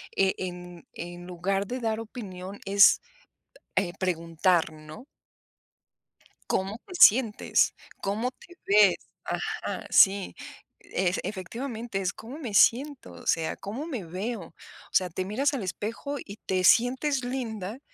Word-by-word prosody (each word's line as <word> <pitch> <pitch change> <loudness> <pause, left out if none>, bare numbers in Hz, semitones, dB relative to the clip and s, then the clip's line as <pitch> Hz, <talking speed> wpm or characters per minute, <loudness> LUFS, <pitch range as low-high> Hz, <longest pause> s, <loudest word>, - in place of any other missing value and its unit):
eh, 195 -1 +3
en 180 -1 -7
en 175 0 -8
lugar 185 +3 -1
de 250 +5 -4
dar 225 -2 -1
opinión 200 -4 -8
es, 200 +1 +6 0.8
eh, 185 -2 +1
preguntar, 170 -1 +1
¿no? 155 +10 -12 1.5
Cómo 195 +4 -1
te 365 - -10
sientes, 230 - +5 0.3
cómo 215 +6 -1
te 345 +7 -17
ves, 200 -2 +6 0.3
ajá, - - -3
sí, 195 0 +5 0.5
ef 185 0 -1
efectivamente, 225 +2 -4
es 185 -2 -1
cómo 245 +7 -9
me 240 -10 -6
siento, 265 +6 +3
o - - -13
sea, 165 -1 +1
cómo 230 +10 -6
me 240 - -5
veo. 205 +7 -4
O 165 -1 -12 0.4
sea, 185 -2 +2
te 185 +3 -3
miras 260 +9 +1
al 265 -7 -2
espejo 225 +9 -4
y 200 +1 -9
te 185 -1 0
sientes 260 +6 +4
linda, 235 -3 -4
200 Hz, 135 wpm, -27 LUFS, 185-240 Hz, 1.5 s, es